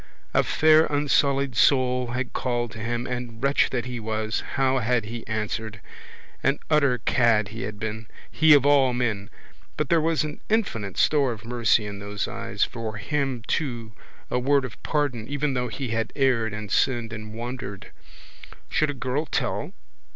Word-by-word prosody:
A - - +5
fair 155 0 +4
unsullied 140 -2 +1
soul 125 -1 +3
had 125 +1 -3
called 120 -2 -1
to 115 - -9
him 120 +2 -2
and, 125 -1 -5
wretch 140 +1 +3
that 120 -3 -2
he 125 -1 -4
was, 110 0 -2
how 135 -1 +2
had 120 -1 +1
he 115 +1 -6
answered? 110 0 -3 0.6
An 135 +1 +2
utter 140 -5 +4
cad 115 -3 +2
he 110 +3 -7
had 105 -4 -5
been! 110 0 -4 0.2
He 155 -1 +6
of 140 -1 +3
all 140 -3 +5
men! 115 -4 -1 0.5
But 150 - -1
there 170 -1 +4
was 160 0 +1
an 150 -1 -6
infinite 115 - -1
store 140 -5 +3
of 105 -1 -11
mercy 120 -2 +2
in 100 -1 -6
those 100 0 -3
eyes, - - -2
for 110 -3 -4
him 135 +1 -2
too 120 -7 -2 0.4
a 125 - +1
word 140 +1 +2
of 110 -6 -10
pardon 140 -7 -1
even 145 0 -1
though 125 -1 -1
he 125 +2 -5
had 115 0 -1
erred 125 -6 +2
and 105 -2 -6
sinned 120 -3 +1
and 110 0 -7
wandered. 120 -4 -6 0.8
Should 155 - +1
a 145 - -3
girl 130 +5 -2
tell? - - -2
125 Hz, 175 wpm, -25 LUFS, 110-140 Hz, 0.8 s, He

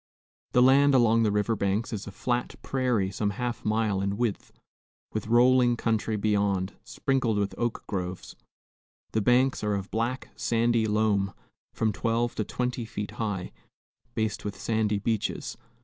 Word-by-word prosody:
The 125 - +6
land 140 +2 +6
along 115 -2 +4
the 110 -2 +2
river 105 +2 +1
banks 100 +3 -1
is 105 -1 -5
a - - -6
flat 120 +4 -2
prairie 125 -8 0
some 105 +1 -1
half 120 +4 -3
mile 110 -2 +1
in 100 +1 -1
width, 120 -4 -2 0.6
with 110 -1 -3
rolling 120 +1 +5
country 110 -1 0
beyond, 100 -2 +1
sprinkled 125 -5 0
with 100 -1 0
oak 120 -1 -2
groves. 90 -2 -5 0.8
The 110 - +1
banks 125 +3 +3
are 105 -1 +1
of 100 0 -5
black, 120 +4 -2
sandy 115 -1 +1
loam, 105 -2 +1 0.4
from 110 -1 +1
twelve 115 +4 0
to 110 - +1
twenty 125 +3 -2
feet 110 -2 -5
high, 100 -5 -2 0.6
based 110 0 -1
with 100 -2 -5
sandy 110 -1 0
beaches. 105 +1 -2
110 Hz, 150 wpm, -27 LUFS, 100-120 Hz, 0.8 s, The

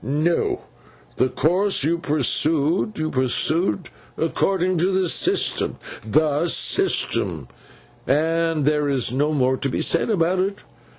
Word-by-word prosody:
'No. 150 +7 0 0.6
The 130 - +2
course 185 +7 +1
you 165 +3 0
pursued, 155 - 0
you 155 0 -2
pursued 155 +8 0 0.3
according 185 +2 0
to 175 - +2
the 190 -1 +1
system—the 150 +1 0
system—and 165 - +1 1.2
there 150 -1 +1
is 130 -5 0
no 145 +4 0
more 130 -3 +1
to 140 - -2
be - - -1
said 170 - +1
about 180 -3 +1
it. 195 +2 -1
155 Hz, 115 wpm, -21 LUFS, 140-180 Hz, 1.2 s, The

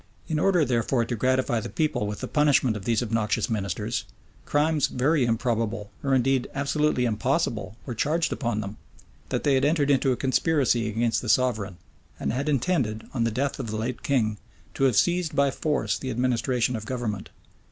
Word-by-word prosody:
In 155 -2 -1
order, 180 -3 +3
therefore, 120 -1 +1
to 120 - -3
gratify 130 0 +1
the - - -6
people 155 -9 0
with 105 0 -5
the - - -3
punishment 145 -6 +3
of 100 -2 -7
these 115 0 +1
obnoxious 110 0 0
ministers 100 -5 -2 0.4
crimes 150 0 +2
very 135 +2 +1
improbable, 115 -3 -1
or 135 -1 +2
indeed 130 0 +2
absolutely 140 -1 +1
impossible, 115 -1 -1
were 125 - -4
charged 160 +8 0
upon 115 -5 -2
them: 100 0 -7 0.5
that - - -1
they 145 - +3
had 135 0 +2
entered 145 -1 +2
into 135 -1 +3
a - - +2
conspiracy 130 -4 +1
against 115 +1 0
the 120 - -5
sovereign, 110 -7 +1 0.4
and - - -1
had 140 +4 -1
intended, 130 -6 0
on 120 -3 0
the - - +2
death 135 +5 -2
of - - -4
the 110 - -3
late 115 +3 -3
king, 110 -7 0 0.3
to 135 - +1
have 130 -4 +3
seized 175 - +2
by 140 -1 +3
force 150 +2 -1
the 130 - -4
administration 125 0 0
of 110 -1 -6
government. 120 -6 -3
125 Hz, 185 wpm, -26 LUFS, 110-140 Hz, 0.5 s, order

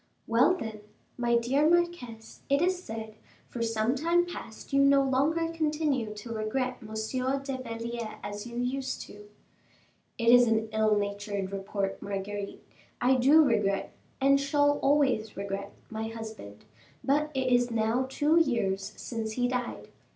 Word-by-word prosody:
"Well, 245 +11 +4
then, 220 -7 -6 0.3
my 240 -1 +1
dear 270 +6 +2
marquise, 340 -11 -1
it 280 0 +4
is 365 0 0
said, 220 -1 -6 0.4
for 240 - -5
some 225 +1 +1
time 335 +5 +2
past, 275 -7 -9
you 275 - +5
no 275 0 +5
longer 310 +5 +1
continue 300 -7 0
to 230 +3 -7
regret 250 +4 -2
Monsieur 235 +5 -2
de 270 -1 -5
Belliere 230 -1 -5
as 205 +2 -5
you 235 0 -7
used 260 +2 -2
to." 205 0 -13 0.9
"It 230 -1 +2
is 245 0 +7
an 220 0 +1
ill 215 -1 +3
natured 200 -1 -3
report, 195 0 -3
Marguerite. 200 0 -5 0.4
I 250 +2 +4
do 275 +5 +6
regret, 210 -7 +1 0.3
and 275 +1 +4
shall 290 +1 +2
always 265 -8 +2
regret, 200 0 -4 0.2
my 220 0 -3
husband; 220 - -9 0.4
but 295 +2 +2
it 260 -1 +1
is 245 0 +3
now 230 +3 0
two 300 +4 +3
years 210 -9 0
since 225 -2 -4
he 245 +1 +1
died. 250 -1 -4
240 Hz, 150 wpm, -29 LUFS, 215-275 Hz, 0.9 s, is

